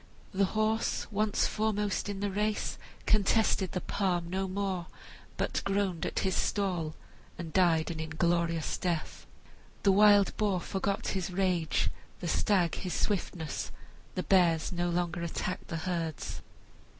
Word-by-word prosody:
The 195 Hz, +1 st, +3 dB
horse, 220 Hz, +1 st, +1 dB
once 210 Hz, 0 st, +2 dB
foremost 210 Hz, -2 st, 0 dB
in 200 Hz, -1 st, -4 dB
the 205 Hz, -1 st, 0 dB
race, 210 Hz, +2 st, -1 dB, 0.3 s
contested 210 Hz, -2 st, +3 dB
the 185 Hz, -, -1 dB
palm 175 Hz, -3 st, -1 dB
no 190 Hz, +1 st, 0 dB
more, 190 Hz, -2 st, -2 dB, 0.5 s
but -, -, 0 dB
groaned 195 Hz, -4 st, 0 dB
at -, -, -5 dB
his 190 Hz, -, +1 dB
stall 180 Hz, -6 st, 0 dB, 0.4 s
and 165 Hz, -2 st, -6 dB
died 170 Hz, -3 st, +3 dB
an 160 Hz, -, -5 dB
inglorious 165 Hz, +1 st, 0 dB
death. 170 Hz, -4 st, -2 dB, 0.6 s
The 200 Hz, -, +6 dB
wild 205 Hz, 0 st, +6 dB
boar 205 Hz, -4 st, +2 dB
forgot 195 Hz, +2 st, -2 dB
his 190 Hz, -2 st, -1 dB
rage, 180 Hz, -3 st, +1 dB, 0.3 s
the 175 Hz, -, -4 dB
stag 175 Hz, 0 st, +2 dB
his 180 Hz, -, -3 dB
swiftness, 175 Hz, -6 st, -2 dB, 0.4 s
the 185 Hz, -, -1 dB
bears 170 Hz, -4 st, +3 dB
no 175 Hz, -1 st, 0 dB
longer 175 Hz, 0 st, -1 dB
attacked 170 Hz, +2 st, -3 dB
the 165 Hz, -, -3 dB
herds. 165 Hz, -2 st, -3 dB
185 Hz, 140 wpm, -30 LUFS, 170-200 Hz, 0.6 s, The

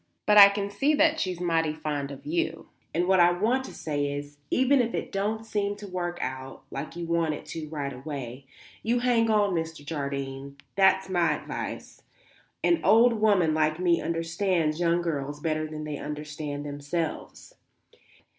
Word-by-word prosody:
But 210 Hz, 0 st, +7 dB
I 200 Hz, 0 st, +11 dB
can 200 Hz, 0 st, -3 dB
see 280 Hz, +9 st, +2 dB
that 315 Hz, +1 st, +3 dB
she's 185 Hz, -, -2 dB
mighty 165 Hz, -3 st, +1 dB
fond 150 Hz, -2 st, -3 dB
of 140 Hz, -2 st, -10 dB
you, 340 Hz, +2 st, -2 dB, 0.2 s
and 175 Hz, +2 st, 0 dB
what 190 Hz, -1 st, +4 dB
I 175 Hz, 0 st, +7 dB
want 220 Hz, +9 st, +1 dB
to -, -, -9 dB
say 145 Hz, -2 st, -2 dB
is, 145 Hz, 0 st, -7 dB
even 260 Hz, +1 st, +4 dB
if 235 Hz, -1 st, -2 dB
it -, -, -4 dB
don't 215 Hz, +3 st, -2 dB
seem 205 Hz, -2 st, -1 dB
to 205 Hz, -, -10 dB
work 175 Hz, -2 st, -3 dB
out 130 Hz, +1 st, -6 dB
like 140 Hz, +4 st, -6 dB
you 170 Hz, 0 st, -4 dB
want 165 Hz, -2 st, 0 dB
it -, -, -10 dB
to 155 Hz, -2 st, -6 dB
right 145 Hz, -3 st, -4 dB
away, 135 Hz, -1 st, -7 dB, 0.3 s
you 240 Hz, +2 st, +1 dB
hang 235 Hz, -2 st, +3 dB
on, 205 Hz, -3 st, +3 dB
Mr. 160 Hz, -3 st, -4 dB
Jardine; 140 Hz, -2 st, -4 dB, 0.2 s
that's 190 Hz, 0 st, +4 dB
my 175 Hz, -3 st, +2 dB
advice; -, -, -6 dB, 0.6 s
an 345 Hz, -1 st, +3 dB
old 230 Hz, +2 st, +6 dB
woman 205 Hz, -7 st, +3 dB
like 155 Hz, +1 st, +1 dB
me 175 Hz, -2 st, +2 dB
understands 165 Hz, -1 st, 0 dB
young 170 Hz, 0 st, +2 dB
girls 145 Hz, -3 st, -3 dB
better 155 Hz, 0 st, -1 dB
than 155 Hz, 0 st, -6 dB
they 150 Hz, -2 st, -5 dB
understand 150 Hz, -1 st, -5 dB
themselves. 145 Hz, +3 st, -4 dB
165 Hz, 175 wpm, -27 LUFS, 150-200 Hz, 0.6 s, I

